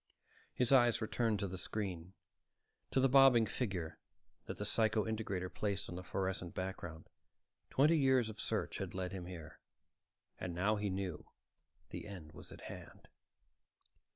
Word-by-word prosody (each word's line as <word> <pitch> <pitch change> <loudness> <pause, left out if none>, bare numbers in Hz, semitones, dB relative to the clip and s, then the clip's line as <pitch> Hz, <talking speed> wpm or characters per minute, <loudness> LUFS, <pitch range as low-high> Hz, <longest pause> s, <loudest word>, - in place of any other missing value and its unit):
His 125 0 +2
eyes 120 -4 +6
returned 110 -1 +1
to 100 - 0
the 95 0 -5
screen, 95 -3 -4 0.8
to - - +2
the 135 - +5
bobbing 135 -3 +7
figure 95 -7 -3 0.5
that - - -5
the 105 - -2
psycho 110 +1 +3
integrator 105 -5 -2
traced 100 -2 -1
on 85 - -5
the 90 - -5
fluorescent 95 -1 -2
background. 85 -4 -5 0.6
Twenty 155 +4 +4
years 130 -4 +4
of 110 -1 -6
search - - -1
had - - -4
led 90 -1 -2
him 90 -2 -5
here, 85 -4 -9 0.8
and 90 -2 -4
now 100 +5 +2
he 105 0 -1
knew 95 -4 -3 0.6
the - - -6
end 90 -7 -8
was - - -10
at - - -11
hand. - - -10
100 Hz, 155 wpm, -36 LUFS, 90-115 Hz, 0.8 s, bobbing